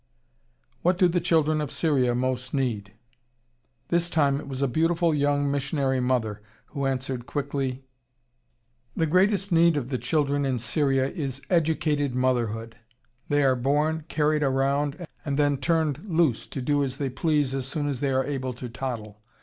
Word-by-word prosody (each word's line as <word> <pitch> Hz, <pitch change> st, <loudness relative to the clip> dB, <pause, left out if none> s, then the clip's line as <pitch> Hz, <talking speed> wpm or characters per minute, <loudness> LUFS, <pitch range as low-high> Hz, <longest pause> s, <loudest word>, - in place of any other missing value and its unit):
"What 180 Hz, +1 st, +2 dB
do 180 Hz, -, +5 dB
the 175 Hz, 0 st, 0 dB
children 155 Hz, -3 st, +2 dB
of 150 Hz, -, -3 dB
Syria 130 Hz, -7 st, +1 dB
most 130 Hz, +1 st, -2 dB
need?" 110 Hz, -7 st, -2 dB, 1.0 s
This 170 Hz, 0 st, +1 dB
time 140 Hz, -4 st, +2 dB
it 150 Hz, -, -9 dB
was 135 Hz, 0 st, -3 dB
a -, -, +3 dB
beautiful, 165 Hz, +5 st, +2 dB
young 145 Hz, -1 st, +1 dB
missionary 140 Hz, -1 st, 0 dB
mother 120 Hz, -5 st, 0 dB, 0.3 s
who 140 Hz, -2 st, -2 dB
answered 130 Hz, -2 st, -3 dB
quickly: 135 Hz, -2 st, -3 dB, 1.1 s
"The 165 Hz, -, +1 dB
greatest 195 Hz, +4 st, +2 dB
need 170 Hz, -1 st, +4 dB
of 130 Hz, -3 st, -3 dB
the 130 Hz, -3 st, -2 dB
children 145 Hz, -2 st, 0 dB
in 135 Hz, -2 st, 0 dB
Syria 135 Hz, +2 st, +1 dB
is 140 Hz, -6 st, -4 dB
educated 155 Hz, -5 st, +1 dB
motherhood. 115 Hz, -3 st, -1 dB, 0.5 s
They 145 Hz, 0 st, +3 dB
are 130 Hz, -1 st, +4 dB
born, 150 Hz, +5 st, 0 dB
carried 150 Hz, -1 st, +1 dB
around, 140 Hz, +4 st, 0 dB, 0.2 s
and 140 Hz, -2 st, -2 dB
then 145 Hz, -1 st, +2 dB
turned 155 Hz, 0 st, 0 dB
loose 160 Hz, -, +1 dB
to 135 Hz, -, -5 dB
do 145 Hz, +1 st, +2 dB
as 135 Hz, -1 st, -3 dB
they 140 Hz, -3 st, -2 dB
please 150 Hz, -2 st, +1 dB
as 135 Hz, -1 st, -3 dB
soon 145 Hz, +1 st, -2 dB
as 140 Hz, -4 st, -2 dB
they 140 Hz, -, 0 dB
are 130 Hz, 0 st, +1 dB
able 130 Hz, -3 st, -3 dB
to 125 Hz, 0 st, -7 dB
toddle. 110 Hz, -3 st, -5 dB
140 Hz, 165 wpm, -26 LUFS, 130-155 Hz, 1.1 s, do